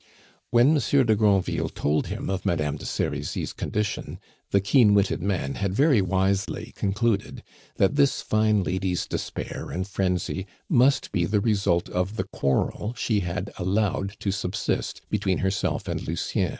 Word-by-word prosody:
When 120 Hz, +6 st, +5 dB
Monsieur 140 Hz, -1 st, +3 dB
de 110 Hz, -3 st, +3 dB
Granville 100 Hz, -3 st, +2 dB
told 75 Hz, +1 st, 0 dB
him -, -, -4 dB
of 95 Hz, -1 st, -2 dB
Madame 75 Hz, -4 st, 0 dB
de 75 Hz, -, -7 dB
Serizy's 70 Hz, 0 st, -2 dB
condition, 105 Hz, -1 st, -3 dB, 0.3 s
the 100 Hz, -, +3 dB
keen 105 Hz, +1 st, +4 dB
witted 100 Hz, -4 st, +2 dB
man 90 Hz, -8 st, -1 dB
had 100 Hz, -1 st, -2 dB
very 140 Hz, -3 st, +4 dB
wisely 95 Hz, +1 st, -1 dB
concluded 105 Hz, +1 st, -1 dB, 0.3 s
that 100 Hz, +9 st, +2 dB
this 140 Hz, -2 st, +3 dB
fine 110 Hz, -2 st, +2 dB
lady's 90 Hz, 0 st, -1 dB
despair -, -, -5 dB
and 95 Hz, +2 st, -3 dB
frenzy 95 Hz, 0 st, -1 dB, 0.2 s
must 130 Hz, +3 st, +3 dB
be 85 Hz, -, +1 dB
the 105 Hz, +4 st, +1 dB
result 100 Hz, -5 st, +1 dB
of 90 Hz, +4 st, -2 dB
the 95 Hz, -, -1 dB
quarrel 95 Hz, -, -1 dB
she 110 Hz, -3 st, 0 dB
had 90 Hz, +2 st, -3 dB
allowed 100 Hz, +1 st, 0 dB
to 100 Hz, -, 0 dB
subsist 95 Hz, -2 st, -2 dB
between 100 Hz, -3 st, +1 dB
herself 95 Hz, 0 st, -1 dB
and -, -, -2 dB
Lucien. 80 Hz, +1 st, -1 dB
100 Hz, 150 wpm, -25 LUFS, 90-110 Hz, 0.3 s, When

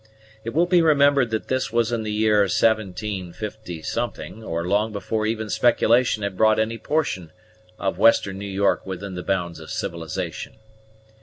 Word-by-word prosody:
It 115 Hz, +3 st, -5 dB
will 170 Hz, +2 st, +4 dB
be 175 Hz, -1 st, +4 dB
remembered 140 Hz, -5 st, +4 dB
that 110 Hz, -1 st, -3 dB
this 130 Hz, 0 st, -1 dB
was 115 Hz, 0 st, +1 dB
in 115 Hz, -1 st, -1 dB
the 110 Hz, -1 st, -3 dB
year 105 Hz, 0 st, +2 dB
175, 105 Hz, 0 st, -2 dB
or 85 Hz, -4 st, -3 dB
long 105 Hz, +3 st, +1 dB
before 110 Hz, +1 st, -2 dB
even 110 Hz, -1 st, -2 dB
speculation 120 Hz, -2 st, +3 dB
had 100 Hz, -2 st, -3 dB
brought 110 Hz, +2 st, +4 dB
any 110 Hz, +1 st, -1 dB
portion 105 Hz, -, -2 dB, 0.5 s
of 95 Hz, -, -2 dB
western 100 Hz, -4 st, +4 dB
New 100 Hz, 0 st, -5 dB
York 100 Hz, +1 st, +1 dB
within 95 Hz, +1 st, -6 dB
the 90 Hz, -, -5 dB
bounds 85 Hz, -3 st, -2 dB
of 80 Hz, -, -11 dB
civilization. 85 Hz, +1 st, -5 dB
110 Hz, 155 wpm, -23 LUFS, 95-115 Hz, 0.5 s, will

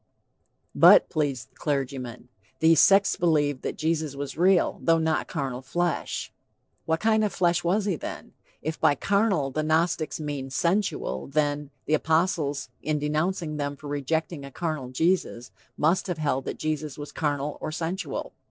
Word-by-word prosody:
"But," -, -, +7 dB
pleads 140 Hz, -7 st, -1 dB
the -, -, -37 dB
clergyman, 130 Hz, -4 st, -3 dB, 0.3 s
"these 160 Hz, -1 st, +6 dB
sects 195 Hz, 0 st, +5 dB
believed 145 Hz, -5 st, +1 dB
that -, -, -4 dB
Jesus 155 Hz, -2 st, -1 dB
was 140 Hz, 0 st, -5 dB
real, 180 Hz, +2 st, +3 dB
though 165 Hz, 0 st, +4 dB
not 160 Hz, -1 st, 0 dB
carnal 135 Hz, -5 st, -3 dB
flesh." 175 Hz, +6 st, -2 dB, 0.5 s
What 160 Hz, 0 st, +1 dB
kind 220 Hz, 0 st, +3 dB
of 210 Hz, -, 0 dB
flesh 175 Hz, -1 st, +1 dB
was 195 Hz, +4 st, +1 dB
he 190 Hz, -6 st, 0 dB
then? -, -, -7 dB, 0.3 s
If 155 Hz, +1 st, -3 dB
by 145 Hz, -, +4 dB
carnal 195 Hz, -5 st, +1 dB
the 155 Hz, -, -1 dB
Gnostics 160 Hz, -1 st, 0 dB
meant 140 Hz, -3 st, -4 dB
'sensual,' 170 Hz, -, 0 dB
then, 145 Hz, 0 st, 0 dB, 0.2 s
the 155 Hz, -, -1 dB
apostles 160 Hz, -2 st, +1 dB
in 155 Hz, +1 st, -1 dB
denouncing 155 Hz, +2 st, -1 dB
them 145 Hz, -1 st, -2 dB
for 150 Hz, -, -15 dB
rejecting 145 Hz, +2 st, -2 dB
a 140 Hz, -, -8 dB
carnal 155 Hz, -3 st, -4 dB
Jesus, 130 Hz, -4 st, 0 dB, 0.3 s
must 165 Hz, +7 st, +2 dB
have 180 Hz, -3 st, -2 dB
held 140 Hz, -4 st, -1 dB
that -, -, -4 dB
Jesus 155 Hz, -2 st, -3 dB
was 145 Hz, 0 st, -7 dB
carnal 145 Hz, -1 st, -2 dB
or -, -, -3 dB
sensual. 170 Hz, +4 st, -4 dB
155 Hz, 160 wpm, -26 LUFS, 145-170 Hz, 0.5 s, But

